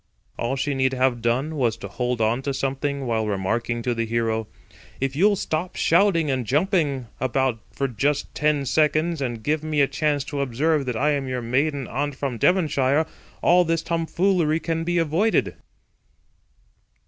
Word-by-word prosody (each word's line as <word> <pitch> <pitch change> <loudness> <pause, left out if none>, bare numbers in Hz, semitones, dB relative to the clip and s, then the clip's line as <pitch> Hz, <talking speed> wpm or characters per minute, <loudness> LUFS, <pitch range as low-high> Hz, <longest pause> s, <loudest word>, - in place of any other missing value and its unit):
All 120 +3 -2
she 140 +1 -1
need 130 -1 +1
have 130 -2 +1
done 130 +7 0
was 120 -4 +1
to 115 - -7
hold 125 -1 -2
on 115 +4 +1
to 140 0 -3
something 135 +1 -2
while 110 -2 0
remarking 115 +4 -1
to 125 - 0
the 115 -1 -2
hero: 115 -1 -1 0.5
"If 135 0 -1
you'll 200 +6 +4
stop 175 -1 -3
shouting 165 -4 +3
and 130 -2 -1
jumping 145 - +1
about 130 -2 0
for 135 - -1
just 135 +4 -1
ten 150 -2 +1
seconds, 155 +3 +1
and 120 -4 -3
give 155 +4 0
me 155 -1 -1
a 140 - +6
chance 145 -2 0
to 140 0 -4
observe 140 +3 0
that 125 -3 -1
I 150 +5 +2
am 140 -2 -1
your 125 -1 -3
maiden 135 +3 0
aunt 145 -1 -2
from 135 -4 -3
Devonshire, 155 - +2 0.4
all 180 +1 +5
this 165 -1 0
tomfoolery 170 -1 +1
can 165 -1 -2
be 175 +1 0
avoided." 170 +7 +1
140 Hz, 170 wpm, -23 LUFS, 125-155 Hz, 0.5 s, a